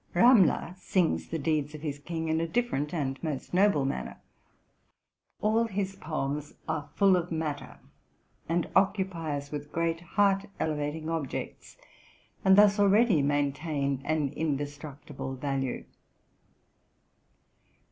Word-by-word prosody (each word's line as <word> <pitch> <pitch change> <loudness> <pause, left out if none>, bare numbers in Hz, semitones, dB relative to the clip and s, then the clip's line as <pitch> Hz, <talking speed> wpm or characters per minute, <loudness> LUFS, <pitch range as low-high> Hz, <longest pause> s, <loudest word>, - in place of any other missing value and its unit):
Ramler 190 -4 +5
sings 180 -3 +1
the 165 - -3
deeds 150 -1 -1
of 150 - -9
his 145 -2 -3
king 160 +2 -4
in 160 +1 +1
a 165 - -1
different 215 - -1
and 135 -5 -2
most 155 -2 -4
noble 185 -7 +4
manner. 135 - -4 1.2
All 220 +2 +3
his 195 -3 -3
poems 150 -4 -4
are 150 -2 -3
full 195 -2 +5
of 175 -1 -2
matter, 155 -3 -3 0.7
and 170 0 +1
occupy 190 -6 +1
us 140 0 -8
with 145 0 -6
great, 165 0 -1
heart 195 +2 +2
elevating 155 0 -2
objects, 160 -5 -4 0.7
and 190 0 +6
thus 205 0 +6
already 200 -3 +5
main 145 0 +1
tain 140 -3 -2
an 150 -1 0
indestructible 145 -2 -4
value. 135 -1 -2
160 Hz, 125 wpm, -29 LUFS, 145-190 Hz, 1.2 s, and